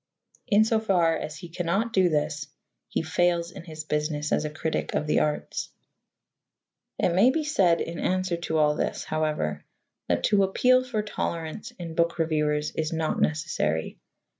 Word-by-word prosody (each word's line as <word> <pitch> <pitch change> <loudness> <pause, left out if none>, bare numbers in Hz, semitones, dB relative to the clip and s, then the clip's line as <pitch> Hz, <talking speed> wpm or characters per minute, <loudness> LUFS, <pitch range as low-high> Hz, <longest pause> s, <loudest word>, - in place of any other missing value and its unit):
In 215 -2 +5
so 225 0 +2
far 180 -6 +2
as 155 0 -5
he 180 - -9
cannot 175 +7 -1
do 185 -3 +4
this, 150 -1 -1 0.4
he - - -1
fails 170 +1 +1
in 170 - -10
his 155 -2 -7
business 150 0 -2
as - - +1
a - - -1
critic 160 +1 -3
of - - 0
the 150 - +2
arts. 150 -1 -2 1.3
It - - +2
may 200 +8 +6
be 310 +4 0
said 190 - +3
in 165 0 -4
answer 185 -1 0
to 160 -1 -2
all 150 -1 +4
this, - - -2
however, 155 - -1 0.4
that - - 0
to 205 -2 +4
appeal 255 +7 +4
for 230 -4 -2
tolerance 170 +1 -4
in 170 -2 -6
book 170 +1 +1
reviewers 150 -2 0
is 155 0 -2
not 160 -1 -1
necessary. 150 - -1
165 Hz, 165 wpm, -26 LUFS, 155-190 Hz, 1.3 s, may